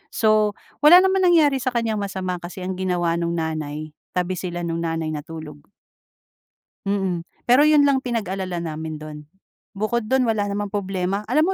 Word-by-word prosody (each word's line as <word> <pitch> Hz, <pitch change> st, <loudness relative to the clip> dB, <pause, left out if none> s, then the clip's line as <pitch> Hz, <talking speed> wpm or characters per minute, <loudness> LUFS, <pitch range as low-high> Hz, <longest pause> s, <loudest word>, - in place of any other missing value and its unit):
So 215 Hz, -2 st, +3 dB, 0.2 s
wala 345 Hz, +5 st, +8 dB
naman 380 Hz, -1 st, +3 dB
nangyari 300 Hz, -6 st, +4 dB
sa 255 Hz, 0 st, -2 dB
kanyang 225 Hz, -3 st, 0 dB
masama 190 Hz, -2 st, -3 dB
kasi 180 Hz, +2 st, -8 dB
ang 185 Hz, 0 st, -4 dB
ginawa 175 Hz, -2 st, 0 dB
no'ng 170 Hz, 0 st, -1 dB
nanay, 155 Hz, -1 st, -4 dB, 0.2 s
tabi 180 Hz, 0 st, -1 dB
sila 175 Hz, -1 st, -4 dB
no'ng 165 Hz, -1 st, -2 dB
nanay 165 Hz, -1 st, -2 dB
natulog. 155 Hz, -1 st, -7 dB, 1.3 s
Mm. 195 Hz, -4 st, -1 dB, 0.2 s
Pero 250 Hz, +4 st, +5 dB
'yun 300 Hz, -1 st, +5 dB
lang 275 Hz, -2 st, +3 dB
pinag-alala 190 Hz, -7 st, -3 dB
namin 160 Hz, -1 st, -4 dB
do'n, 150 Hz, 0 st, -8 dB, 0.6 s
bukod 215 Hz, +2 st, -1 dB
do'n 265 Hz, -1 st, +3 dB
wala 210 Hz, -3 st, 0 dB
namang 205 Hz, 0 st, -3 dB
problema. 195 Hz, 0 st, -1 dB
Alam 310 Hz, +9 st, +3 dB
190 Hz, 155 wpm, -22 LUFS, 170-235 Hz, 1.3 s, wala